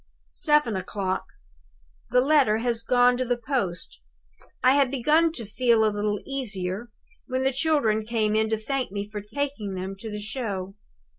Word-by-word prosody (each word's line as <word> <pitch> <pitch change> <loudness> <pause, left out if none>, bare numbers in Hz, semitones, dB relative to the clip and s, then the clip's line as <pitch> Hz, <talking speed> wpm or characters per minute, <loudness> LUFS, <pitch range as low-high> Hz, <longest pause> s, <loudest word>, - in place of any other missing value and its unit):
"Seven 295 - +2
o'clock. 190 0 -2 0.8
The 250 +1 +4
letter 270 -6 +4
has 230 0 -1
gone 245 +1 +4
to 255 - 0
the 245 -1 0
post. 225 - -3 0.6
I 255 - +7
had 280 -2 +3
begun 300 +6 +3
to 235 -8 -5
feel 230 +1 +3
a 215 - +1
little 205 0 -1
easier, 215 -5 -4 0.4
when 260 0 -1
the 265 0 +2
children 265 -7 +2
came 215 -1 0
in 220 0 +2
to 220 - +1
thank 255 +1 -2
me 200 0 -4
for 210 0 -6
taking 220 -3 -4
them 190 +1 -4
to 220 +3 -7
the 210 0 -5
show. 205 -4 -4
230 Hz, 165 wpm, -26 LUFS, 210-260 Hz, 0.8 s, I